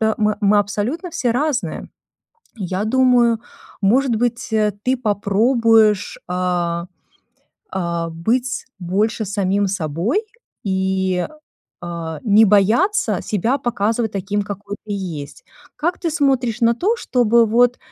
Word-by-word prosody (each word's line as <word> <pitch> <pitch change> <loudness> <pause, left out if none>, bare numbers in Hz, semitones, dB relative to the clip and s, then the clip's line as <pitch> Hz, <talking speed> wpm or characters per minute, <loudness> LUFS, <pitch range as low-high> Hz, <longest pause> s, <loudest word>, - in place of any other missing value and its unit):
Мы 220 0 +2
мы 210 -1 +1
мы 205 0 +4
абсолютно 230 - -2
все 245 -6 -1
разные. 280 +1 -2 0.7
И 200 - -5
я 185 +3 -2
думаю, 240 -1 +3 0.4
может 240 +4 +3
быть, 240 +1 -1
э, 210 -1 +2
ты 260 +1 +2
попробуешь, 220 -1 +2
а, 175 -1 -1 0.8
а, 170 -2 -2
быть 240 +10 -1
больше 210 +5 0
самим 200 0 0
собой 185 - -1 0.4
и, 190 -1 0 0.6
а, 165 -2 -5
не 220 0 +5
бояться 215 - +3
себя 225 +6 0
показывать 225 -1 -1
таким, 200 +1 -1
какой 205 0 -6
ты 210 - -6
есть. 165 -7 -6 0.3
Как 345 +4 -1
ты 335 - -1
смотришь 265 -6 +1
на 235 0 +4
то, 405 - +1
чтобы, 235 - +3
вот, 245 +3 +3
215 Hz, 125 wpm, -20 LUFS, 190-245 Hz, 0.8 s, не